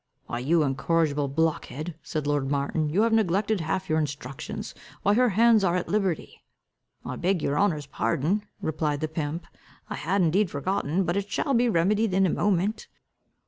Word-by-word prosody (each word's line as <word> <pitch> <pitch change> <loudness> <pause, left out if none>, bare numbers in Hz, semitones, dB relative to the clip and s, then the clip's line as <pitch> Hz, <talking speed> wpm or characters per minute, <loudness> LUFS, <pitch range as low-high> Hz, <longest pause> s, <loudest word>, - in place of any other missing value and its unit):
"Why, 120 - -4
you 155 +6 +2
incorrigible 145 +1 +1
blockhead," 155 +2 -1
said 155 -2 -4
lord 145 -2 0
Martin, 145 +2 0
"you 190 +8 +2
have 230 0 +2
neglected 205 -1 +2
half 185 +4 -2
your 155 0 +2
instructions. 140 -3 -5 0.3
Why, 205 - +4
her 250 +3 +4
hands 225 +1 +4
are 175 -2 +2
at 180 - -2
liberty." 195 -6 -1 0.6
"I 125 0 -4
beg 180 -2 0
your 145 +1 0
honour's 160 -8 +1
pardon," 165 +7 0 0.2
replied 150 -2 -1
the 155 - 0
pimp, 155 +1 -4 0.5
"I - - -1
had 185 +5 +1
indeed 180 +4 +2
forgotten, 180 +3 -1
but 175 +2 -1
it 200 0 -2
shall 275 - 0
be 240 0 +3
remedied 205 +2 +2
in 195 0 +4
a 180 - +2
moment." 205 +2 0
170 Hz, 175 wpm, -26 LUFS, 150-200 Hz, 0.6 s, Why